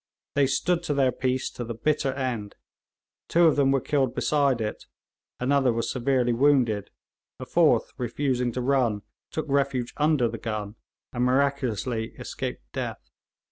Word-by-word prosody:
They 140 -1 +3
stood 165 +6 +1
to 145 - -1
their 135 -2 +3
piece 130 0 -1
to 120 - -6
the 115 0 -5
bitter 150 +2 0
end. 125 -7 -3 0.7
Two 170 +1 +4
of 160 - +5
them 140 -2 +3
were 135 0 +3
killed 135 -2 0
beside 140 -4 +2
it, 105 -1 -4 0.5
another 135 0 +2
was 115 0 -1
severely 125 -1 +1
wounded, 120 -6 +2 0.5
a - - -6
fourth, - - +3
refusing 125 0 -1
to 125 - -2
run, 120 -6 +1 0.3
took 155 - -3
refuge 135 -3 0
under 150 -5 +3
the 115 0 -5
gun, 105 -2 -4 0.4
and 120 0 0
miraculously 125 -4 0
escaped - - -5
death. - - -5
130 Hz, 150 wpm, -26 LUFS, 120-140 Hz, 0.7 s, of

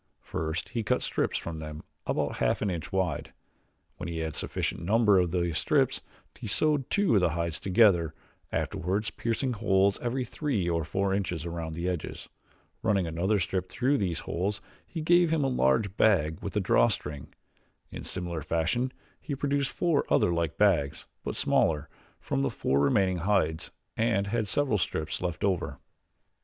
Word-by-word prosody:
First 80 +2 -3
he 115 - -2
cut 125 +4 0
strips - - 0
from 80 -2 -5
them 75 0 -7 0.2
about - - -1
half - - +1
an 100 - 0
inch 85 -3 -5
wide. 95 -5 -1 0.6
When 90 - -5
he 85 - -4
had 80 -1 -2
sufficient - - -2
number 105 +1 +4
of 90 -1 +2
these 85 -2 0
strips - - +2 0.4
he 120 - -5
sewed 145 +5 +2
two 200 - +2
of 100 - +5
the 90 - +3
hides 85 -2 -2
together, 95 -5 +4 0.4
afterwards 100 +3 -1
piercing 120 +3 -1
holes 100 -3 +2
every 125 +1 -1
three 125 - -1
or 85 -1 +1
four 95 +5 0
inches 90 -5 -2
around 85 -2 -4
the 85 +2 -2
edges. 90 -3 -4 0.5
Running 100 -5 +2
another 85 +6 +1
strip 95 0 -2
through 130 +2 +1
these 90 -5 -1
holes 100 +4 -2 0.4
gave 175 0 +4
him 160 -3 +2
a - - +2
large 100 - +2
bag 80 -8 +3
with - - -5
a - - +4
drawstring. 70 +3 +1 0.6
In - - -6
similar 85 -3 -4
fashion 85 - 0 0.3
he 145 - -4
produced 140 0 0
four 170 -5 +1
other 85 - +4
like 85 -2 -1
bags, 85 -9 +2 0.2
but - - -3
smaller, 75 -2 +2 0.3
from 70 - -1
the 70 - +1
four 70 - 0
remaining 90 +5 +2
hides 85 -3 +1 0.3
and 110 -3 +1
had 110 +1 -1
several 130 -4 +1
strips 80 -3 -2
left 90 -3 -3
over. 95 -3 0
95 Hz, 165 wpm, -28 LUFS, 85-115 Hz, 0.6 s, of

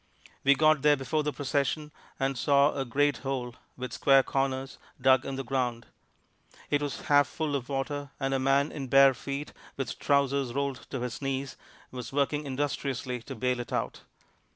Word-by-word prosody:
We 140 +1 +6
got 155 0 +4
there 150 0 +5
before 145 +4 -1
the 150 0 -1
procession, 145 +1 -1 0.3
and 135 0 0
saw 140 +3 +3
a 135 - -2
great 145 +4 +1
hole, 130 -3 -3 0.2
with 125 0 -5
square 135 -1 +5
corners, 135 0 -2 0.2
dug 130 0 +4
in 135 - -3
the 135 - -3
ground. 120 -2 -2 0.9
It 145 - +2
was 145 -1 -3
half 145 -1 +4
full 155 -3 -2
of 130 -1 -4
water, 140 +1 -3
and 135 -1 -1
a 135 - +1
man 135 +3 +2
in 135 -3 -5
bare 135 +1 +7
feet, 140 +3 -5 0.2
with 135 - -4
trousers 140 -3 +1
rolled 140 -2 -2
to 130 - -4
his 125 +1 -4
knees, 135 0 -3 0.4
was 125 -2 -7
working 145 +1 0
industriously 130 -2 -2
to 135 +3 -8
bail 125 +2 0
it 120 - -6
out. - - -2
135 Hz, 175 wpm, -29 LUFS, 130-145 Hz, 0.9 s, bare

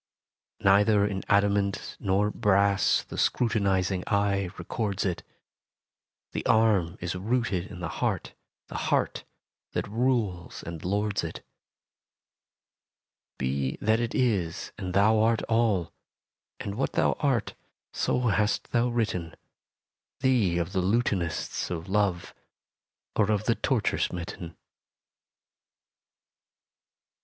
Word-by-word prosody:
Neither 100 +1 +5
in 100 -2 -2
adamant 100 -1 +1
nor 100 +1 +1
brass 100 -1 +3
The - - -7
scrutinizing 95 -5 +1
eye 100 -2 +1
records 100 +2 -2
it: 90 -3 -1 1.1
The - - -3
arm 100 -6 +3
is 85 0 -3
rooted 100 -2 -1
in 90 - -9
the 90 - -2
heart, - - -2 0.3
The - - -7
heart - - 0 0.5
that - - -2
rules 110 -6 -1
and 85 -2 -7
lords 100 +1 0
it. 80 - -6 1.9
Be 65 +1 -1
that 110 +2 +2
it 120 0 -2
is 100 -10 0
and 90 -1 -5
thou 110 +2 +5
art 115 0 +2
all: 110 -7 +1 0.7
And 100 - -4
what 130 +6 -2
thou - - +3
art 135 -7 0 0.4
so 125 - 0
hast 110 -3 +1
thou 120 0 +2
written 100 -8 -2 0.9
Thee 115 -10 +3
of 85 +1 -1
the 95 - +1
lutanists 95 -4 0
of 85 -2 -4
Love, 95 -3 0 0.8
Or 105 -1 +2
of 105 -2 +1
the - - +3
torture - - 0
smitten. 85 -1 -4
100 Hz, 110 wpm, -27 LUFS, 90-110 Hz, 1.9 s, Neither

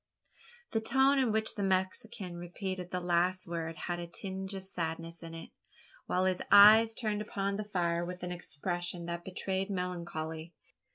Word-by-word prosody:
The 225 - +1
tone 265 +4 +4
in 255 -4 +2
which 220 0 +1
the 205 - -4
Mexican 190 0 -1
repeated 180 +1 -5
the 180 - -2
last 180 +1 +1
words 165 -1 -4
had 175 -1 -2
a 170 - -5
tinge 190 +2 -5
of 190 0 -7
sadness 165 -2 -4
in 165 -1 -8
it 165 - -9 0.6
while 185 +1 +1
his 185 -1 +1
eyes 220 +2 +9
turned 215 -3 -1
upon 200 -1 -2
the 210 - -3
fire 175 -4 0
with 180 +1 -6
an 180 - -3
expression 175 0 -3
that 170 0 -4
betrayed 190 +1 -2
melancholy. 170 -3 -4
180 Hz, 165 wpm, -32 LUFS, 170-200 Hz, 0.6 s, eyes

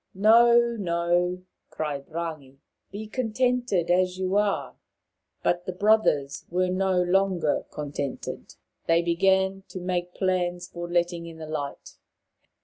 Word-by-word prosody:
" - - -51
No, 235 +4 +6 0.2
no," 175 0 0 0.3
cried 145 -3 -4
Rangi; 155 -5 -6 0.2
" - - -52
be 205 +2 -6
contented 245 -5 0
as 180 0 +2
you 190 +1 -1
are." 205 -1 0 0.7
But 175 0 0
the 185 - -2
brothers 180 -9 +2
were 180 +1 +1
no 185 0 +1
longer 180 -4 +1
contented. 145 -2 -5 0.3
They 165 +1 +3
began 190 +2 +2
to 185 - -7
make 180 -1 -3
plans 180 -2 -1
for 175 0 -7
letting 175 -1 0
in 165 -1 -10
the 160 - -7
light. 145 -2 -6
180 Hz, 135 wpm, -26 LUFS, 170-195 Hz, 0.7 s, No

